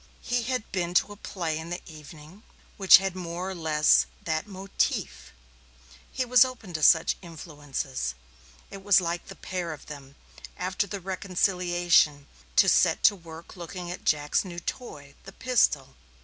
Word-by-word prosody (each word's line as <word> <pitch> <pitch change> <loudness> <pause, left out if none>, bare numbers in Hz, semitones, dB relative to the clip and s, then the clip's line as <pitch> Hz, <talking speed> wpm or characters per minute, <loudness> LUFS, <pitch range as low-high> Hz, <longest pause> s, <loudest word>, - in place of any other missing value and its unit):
He 245 0 0
had 255 -2 -3
been 175 -2 -2
to 205 - +3
a - - -9
play 170 -6 -4
in 160 +1 -8
the 175 +1 -4
evening 155 +3 -13 0.3
which 195 -3 +8
had 190 -1 -3
more 180 +1 -5
or - - -4
less 155 -3 +3 0.2
that 160 +4 -2
motif; 185 - -3 0.8
he 260 - -2
was 250 0 +6
open 245 -8 -7
to 155 - -4
such 160 +2 +4
influences. 145 - -5 0.6
It 195 -1 -10
was 200 -1 +5
like 170 -1 -4
the - - -10
pair 180 -2 -5
of 155 - -13
them, 140 -2 -11 0.4
after 185 +2 -2
the 200 0 -5
reconciliation, 175 -5 +1 0.3
to 195 - +5
set 170 -3 +3
to 205 - +6
work 165 -1 -12
looking 175 0 -7
at 180 - -8
Jack's 150 -1 +1
new 175 -3 -7
toy, 145 - -7
the 195 - -11
pistol. 150 - +1
175 Hz, 160 wpm, -26 LUFS, 155-195 Hz, 0.8 s, which